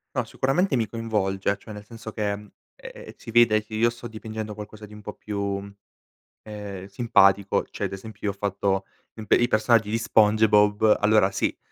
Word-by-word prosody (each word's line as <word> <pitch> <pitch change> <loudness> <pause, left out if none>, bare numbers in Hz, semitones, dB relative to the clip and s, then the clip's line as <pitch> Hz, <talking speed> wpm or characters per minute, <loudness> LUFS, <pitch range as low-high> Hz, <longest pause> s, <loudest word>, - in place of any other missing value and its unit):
No, - - 0
sicuramente, 145 +5 0
mi 115 -3 0
coinvolge, 100 -3 -1
cioè 110 +2 -11
nel 105 0 -10
senso 115 0 -9
che, 105 -1 -2 0.5
ehm, - - -11
si 115 - -10
vede 110 -2 +4
che 110 - -14
io 115 +2 +3
sto 120 0 -9
dipingendo 110 -1 -6
qualcosa 105 +1 -10
di 105 - -15
un 105 - -11
po' - - -7
più, 100 -1 -4 0.7
ehm, 105 -3 -8
simpatico, 100 -2 +3
cioè - - -4
ad - - -4
esempio 105 +2 -9
io 105 - +1
ho 100 - -14
fatto 100 -1 -1 0.3
imp 110 -1 -11
i 120 - +5
personaggi 110 -1 +2
di 110 - 0
Spongebob, 105 -1 +4
allora, 105 -2 +3
sì, 95 - -1
105 Hz, 180 wpm, -25 LUFS, 100-110 Hz, 0.7 s, i